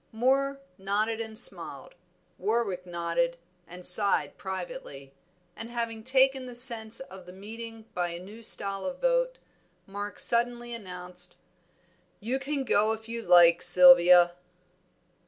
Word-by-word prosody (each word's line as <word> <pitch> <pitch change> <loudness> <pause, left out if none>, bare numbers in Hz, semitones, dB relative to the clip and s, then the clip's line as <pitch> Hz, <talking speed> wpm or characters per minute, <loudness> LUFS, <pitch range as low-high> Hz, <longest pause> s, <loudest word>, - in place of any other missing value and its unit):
Moor 270 +4 0 0.2
nodded 215 +4 -2
and 220 -1 -8
smiled, 245 - -1 0.5
Warwick 205 -5 -2
nodded, 170 0 -2 0.3
and 180 +1 -11
sighed 200 +2 +3
privately, 185 - -8 0.4
and 225 - -9
having 230 -2 -5
taken 265 +1 +2
the 245 - -10
sense 235 -3 +2
of 190 -8 -12
the - - -10
meeting 225 +3 -10
by 175 -1 -2
a 170 0 -7
new 205 +5 -13
style 195 -3 -3
of 275 - -6
vote, - - 0 0.5
Mark 205 +1 -7
suddenly 240 0 -1
announced 180 -4 -6 0.8
"You 245 +5 -3
can 275 0 -3
go 215 -3 +1
if 220 0 -10
you 230 0 -6
like, 175 -4 +5
Sylvia." 175 0 +7
220 Hz, 130 wpm, -27 LUFS, 180-240 Hz, 0.8 s, Sylvia